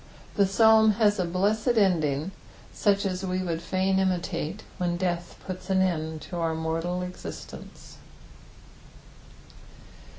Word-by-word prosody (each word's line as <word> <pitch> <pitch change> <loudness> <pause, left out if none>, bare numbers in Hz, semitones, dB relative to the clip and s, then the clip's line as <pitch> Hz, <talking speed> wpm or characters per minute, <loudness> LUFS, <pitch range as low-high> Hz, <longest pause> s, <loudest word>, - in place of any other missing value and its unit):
The 200 -2 +3
Psalm 220 +2 +5
has 210 -1 +2
a 180 - +1
blessed 210 +7 +1
ending, 165 -5 +2 0.4
such 200 0 +2
as 185 -1 -2
we 185 0 -1
would 165 -2 -2
fain 190 +2 0
imUate 185 -1 -1 0.2
when 175 -1 0
death 175 -1 -2
puts 185 0 -7
an 190 0 +3
end 160 -3 -2
to 175 +4 -7
our 165 -1 0
mortal 165 +3 -2
existence. 180 0 -9
185 Hz, 125 wpm, -27 LUFS, 170-195 Hz, 0.4 s, Psalm